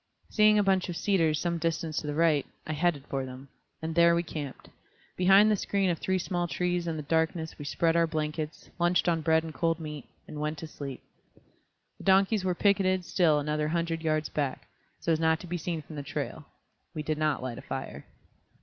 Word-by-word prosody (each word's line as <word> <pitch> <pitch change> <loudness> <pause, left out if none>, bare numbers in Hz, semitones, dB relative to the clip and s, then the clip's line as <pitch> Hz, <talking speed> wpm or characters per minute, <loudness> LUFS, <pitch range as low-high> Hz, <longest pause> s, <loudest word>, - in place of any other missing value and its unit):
Seeing 215 -1 +5
a 205 - +4
bunch 190 -2 +2
of 170 - -3
cedars 165 -6 +2
some 170 +1 -1
distance 165 -1 -2
to 150 - -2
the 145 - -2
right, 155 -3 +3 0.2
I 155 - -3
headed 155 -3 0
for 135 -2 -2
them. 130 +1 -9 0.3
And 160 0 -2
there 170 0 +5
we 170 - +1
camped. 150 -4 -7 0.5
Behind 195 +4 +6
the - - +4
screen 195 -1 0
of 165 - -3
three 190 0 0
small 175 -1 -1
trees 175 0 -1
and 160 -1 -2
the 150 - -4
darkness 160 +1 -1
we 145 - -6
spread 165 +3 +1
our 170 0 +4
blankets, 155 0 -4
lunched 175 +1 +2
on 165 -2 +2
bread 160 0 +3
and 160 -1 -7
cold 165 0 0
meat, 150 -3 -7 0.2
and 150 - -7
went 150 +1 -2
to 160 - -6
sleep. 140 -4 -8 1.0
The - - -10
donkeys 195 +1 +4
were 185 -1 0
picketed 185 -2 +2
still 165 -5 +3
another 150 +1 -1
hundred 165 0 -1
yards 155 -1 0
back, 140 -3 -3 0.3
so 170 - -1
as 160 - +2
not 160 0 +2
to - - -8
be 175 0 -3
seen 165 -1 -3
from 155 - -11
the - - -3
trail; 140 - -5 0.5
we 155 - -3
did 155 0 -2
not 155 -4 0
light 130 -1 -4
a - - -8
fire. 135 0 -6
165 Hz, 215 wpm, -29 LUFS, 150-175 Hz, 1.0 s, Behind